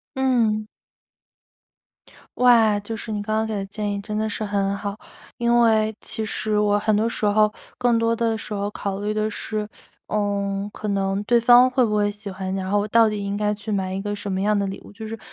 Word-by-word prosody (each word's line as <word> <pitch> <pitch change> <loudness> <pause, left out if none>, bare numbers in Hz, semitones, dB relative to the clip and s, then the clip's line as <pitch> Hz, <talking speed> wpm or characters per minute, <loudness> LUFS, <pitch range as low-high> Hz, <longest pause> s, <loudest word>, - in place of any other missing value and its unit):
嗯。 230 -5 +1 1.7
哇， 230 -4 +5
就 215 +2 -5
是 220 - -5
你 210 -1 -2
刚 215 +1 -2
刚 220 - +1
给 - - -3
的 195 -2 -3
建 205 0 -3
议 200 - -3
真 210 +1 -5
的 220 0 0
是 215 - -3
很 200 -1 0
好， 200 0 -4 0.4
因 240 0 +3
为 220 -1 +3
其 220 - -2
实 215 0 -1
我 205 0 +3
很 215 +1 +1
多 225 +2 +2
时 220 - -2
候 210 +1 +3 0.3
更 240 -2 +3
多 230 0 +2
的 230 -1 0
时 215 -1 -6
候 200 0 -2
考 200 -1 -4
虑 210 +1 -1
的 215 0 0
是， 215 0 -4 0.4
呃， 200 -1 -1
可 215 - -7
能 195 -1 0
对 240 +2 +3
方 245 +2 +7
会 255 -1 +2
不 210 -1 0
会 205 0 +2
喜 205 0 -6
欢， 190 0 -4
然 190 0 -3
后 205 - +3
我 205 - 0
到 225 +1 +4
底 210 - -3
应 200 0 -2
该 210 0 0
去 210 +1 -6
买 190 -2 -1
一 190 - -3
个 205 +1 -3
什 205 -1 -5
么 190 - -1
样 210 +1 +2
的 200 -1 0
礼 195 - -6
物， - - -13
就 220 +2 -9
是 225 0 -6
210 Hz, 245 characters per minute, -23 LUFS, 200-220 Hz, 1.7 s, 方